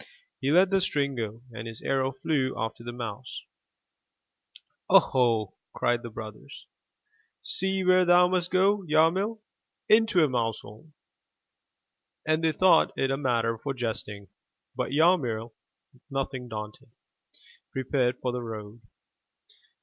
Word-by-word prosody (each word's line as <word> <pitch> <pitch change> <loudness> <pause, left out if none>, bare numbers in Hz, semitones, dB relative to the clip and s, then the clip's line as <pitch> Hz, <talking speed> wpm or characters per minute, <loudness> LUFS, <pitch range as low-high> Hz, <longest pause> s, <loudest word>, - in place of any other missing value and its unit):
He 135 - 0
let 185 +4 +5
the 195 -1 +3
string 140 -6 0
go, 115 -1 -5
and 110 0 -7
his 115 0 -9
arrow 135 -1 0
flew 135 0 -1
after 115 +1 -4
the 120 - -6
mouse. 120 0 -7 1.5
0 - - +10
ho!'' 115 -6 0 0.2
cried 120 0 0
the 120 - -7
brothers. 110 -1 -10 0.8
''See 190 +1 -1
where 185 0 +5
thou 175 0 +5
must 180 -1 -1
go, 195 +2 +3
Yarmil! 180 +8 +2 0.5
Into 215 -6 +4
a - - +4
mousehole!*' 115 +2 -4 1.3
And 155 +1 +1
they 160 - +3
thought 185 +4 +4
it 135 0 0
a - - +1
matter 115 -4 0
for 135 +2 -4
jesting. 105 -4 -5 0.5
But - - -2
Yarmil, 135 -8 +2 0.6
nothing 135 -2 -4
daunted, 105 0 -8 0.8
prepared 130 -1 0
for 125 - -1
the 125 0 -4
road. 110 -1 -8
130 Hz, 125 wpm, -27 LUFS, 115-165 Hz, 1.5 s, 0